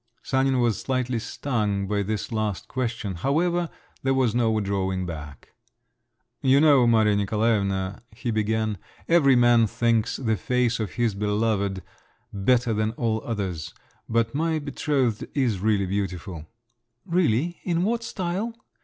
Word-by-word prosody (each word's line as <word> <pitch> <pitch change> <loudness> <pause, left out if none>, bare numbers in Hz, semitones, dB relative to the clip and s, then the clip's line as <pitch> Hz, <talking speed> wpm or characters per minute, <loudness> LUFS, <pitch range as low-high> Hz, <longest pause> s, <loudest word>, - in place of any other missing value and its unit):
Sanin 130 -1 +1
was 120 -3 +1
slightly 130 -2 -1
stung 105 -5 -2
by 100 +1 0
this 105 +3 -3
last 110 -4 -2
question…. 120 -5 -3
However, 170 - +1 0.3
there 135 0 +1
was 130 -5 +2
no 115 -2 +2
drawing 95 -2 -1
back. 75 -4 -8 0.9
"You 135 +1 +5
know, 140 -5 +5
Maria 110 -3 +4
Nikolaevna," 100 -2 0
he 115 +2 -4
began, 110 -1 0 0.3
"every 145 -6 +5
man 120 -2 +5
thinks 115 0 +1
the 110 -5 0
face 125 0 0
of 110 -3 -3
his 120 -3 +1
beloved 105 -1 0 0.5
better 115 +4 +2
than 110 +1 0
all 110 -2 -1
others; 90 -8 -4 0.3
but 115 0 +1
my 160 +2 0
betrothed 140 -5 -1
is 125 -9 +1
really 100 -1 +2
beautiful." 90 -4 -4 0.6
"Really? 170 - +1
In 175 -1 0
what 230 +4 0
style? 205 +1 -3
115 Hz, 135 wpm, -25 LUFS, 100-130 Hz, 0.9 s, You